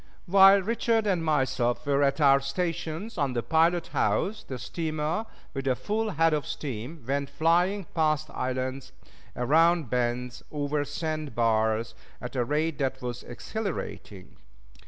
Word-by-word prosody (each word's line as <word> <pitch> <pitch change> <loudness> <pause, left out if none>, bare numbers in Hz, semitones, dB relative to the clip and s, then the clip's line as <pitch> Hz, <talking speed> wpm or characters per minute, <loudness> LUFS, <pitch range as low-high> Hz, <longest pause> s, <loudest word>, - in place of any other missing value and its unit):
While 195 +1 +7
Richard 225 +1 +1
and 185 -5 +1
myself 130 -5 0
were 140 0 +2
at 140 +2 +2
our 140 -2 +6
stations 165 +7 -3
on 140 -3 +1
the 120 -1 -1
pilot 165 +1 +2
house, 210 +2 0
the 130 - -6
steamer, 155 - -3 0.3
with 135 -1 -4
a 130 - +3
full 215 - -2
head 165 -3 +2
of 150 -2 -1
steam, 135 +2 -6
went 140 +1 -1
flying 175 +5 +2
past 155 -1 +1
islands, 130 +1 -3 0.4
around 160 +2 +3
bends, 125 0 -1
over 145 0 -1
sand 155 0 -4
bars, 110 -1 +1 0.3
at 125 +2 -7
a 125 - +2
rate 150 +3 -1
that 135 -1 -1
was 120 -1 -4
exhilarating. 120 - -6
150 Hz, 140 wpm, -27 LUFS, 130-170 Hz, 0.4 s, While